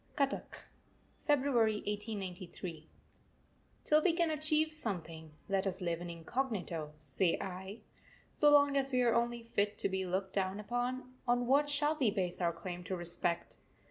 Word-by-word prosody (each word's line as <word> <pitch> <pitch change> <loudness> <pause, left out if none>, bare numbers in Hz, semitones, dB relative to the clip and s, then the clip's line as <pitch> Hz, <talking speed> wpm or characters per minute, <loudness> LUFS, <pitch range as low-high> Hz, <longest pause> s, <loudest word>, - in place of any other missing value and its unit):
CUTTACK, 275 -2 -1 0.6
February 260 -7 +3
1893. 185 -6 -5 0.9
Till 305 +1 +4
we 340 +1 +3
can 335 -1 +2
achieve 310 +1 +2
something, 165 - -5 0.2
let 195 0 +1
us 190 - -2
live 170 -2 -2
incognito, 175 - -3
say 155 +4 +1
I. 190 +3 -6 0.5
So 295 - +5
long 285 -1 +6
as 275 0 +1
we 250 -1 +3
are 235 -1 +4
only 235 0 0
fit 205 -2 0
to - - +3
be 190 0 -1
looked 190 +1 -2
down 190 0 0
upon, 245 +4 -3
on 245 0 +2
what 285 +4 +3
shall 295 +1 +2
we 250 -6 +4
base 190 -4 -2
our 170 -1 +2
claim 175 +1 -6
to 185 - -2
respect? 175 0 -1
210 Hz, 150 wpm, -34 LUFS, 180-265 Hz, 0.9 s, long